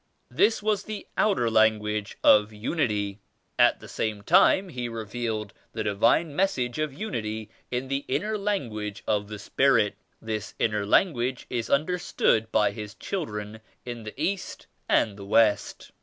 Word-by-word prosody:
This 210 - +2
was 215 -2 +1
the 215 -1 -6
outer 195 - +2
lan 110 -1 +4
guage 105 -1 -4
of 105 0 +6
unity. 105 - -1 0.4
At - - +5
the - - -10
same 105 -2 -3
time 190 - +5
He 125 -6 -4
revealed 110 -1 -4 0.2
the 110 - -2
Divine 110 +9 +2
Message 130 -9 0
of 155 -1 -1
Unity 110 - -4 0.2
in 125 +1 -2
the 135 +1 -2
inner 205 +11 -1
language 120 - -3
of 105 -1 0
the 105 0 -7
Spirit. 115 0 +2 0.3
This 110 -2 -5
inner 105 -2 0
language 130 - +2
is 120 -2 -2
understood 140 -8 +1
by 110 -1 +3
His 105 -2 -8
children 110 - -5 0.2
in 120 -1 -6
the 110 -1 -9
East 195 0 -3 0.2
and 105 -3 +2
the 100 - -9
West. 110 -1 +2
115 Hz, 150 wpm, -26 LUFS, 105-145 Hz, 0.4 s, of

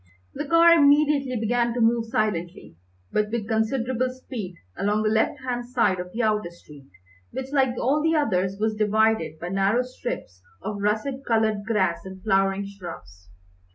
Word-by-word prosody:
The 295 - -5
car 335 +2 +6
immediately 285 -4 +4
began 235 +1 0
to - - -1
move 230 0 +2
silently, 185 - -2 0.4
but 210 0 0
with 220 -2 -3
considerable 240 +3 0
speed, 245 -7 -7 0.2
along 210 +2 0
the 215 - +1
left 220 0 +1
hand 245 -2 -3
side 240 -7 +1
of 180 0 -6
the 230 +4 -2
outer 210 -5 +1
street, 150 -5 -16 0.4
which, 265 +2 -6
like 265 -4 +2
all 285 +4 +2
the 320 +1 +2
others, 195 -9 0
was 220 0 +1
divided 215 -6 +1
by 175 +2 -6
narrow 195 +6 +2
strips 240 - -6 0.2
of 205 -1 -4
russet 220 +7 -1
coloured 220 -4 +1
grass 200 -6 0
and 190 -1 -10
flowering 195 -1 +1
shrubs. 130 - -10
220 Hz, 160 wpm, -24 LUFS, 195-250 Hz, 0.4 s, car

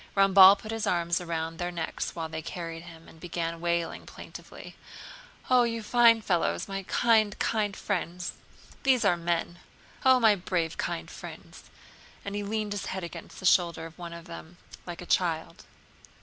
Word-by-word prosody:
Ramballe 195 0 +8
put 215 - -8
his 225 -1 -2
arms 170 -2 +1
around 165 -1 -3
their 175 0 -2
necks 165 -2 -4
while 165 -1 -3
they 160 0 -5
carried 165 0 -6
him 165 -1 -13
and 160 - -16
began 165 -1 -4
wailing 170 -1 -1
plaintively: - - -11 0.7
"Oh, 255 -1 +5
you 230 -1 -1
fine 230 0 +5
fellows, 175 -5 0
my 195 -1 -4
kind, 220 -4 +3
kind 210 -3 0
friends! 180 -2 -3 0.5
These 255 -4 +3
are 190 -3 +4
men! 170 0 -2 0.4
Oh, 260 -1 +6
my 220 -3 +6
brave, 175 -4 -2
kind 80 - -3
friends," - - -11 0.6
and 200 - -4
he 205 - -2
leaned 210 0 -2
his 205 -1 -3
head 190 -1 -4
against 170 - -9
the 185 - -7
shoulder 170 -2 +3
of 165 +2 -12
one 170 -1 -7
of 170 0 -9
the 170 -2 -8
men 175 +2 -19 0.3
like 175 0 -6
a - - -10
child. 170 -3 -1
175 Hz, 175 wpm, -28 LUFS, 170-205 Hz, 0.7 s, Ramballe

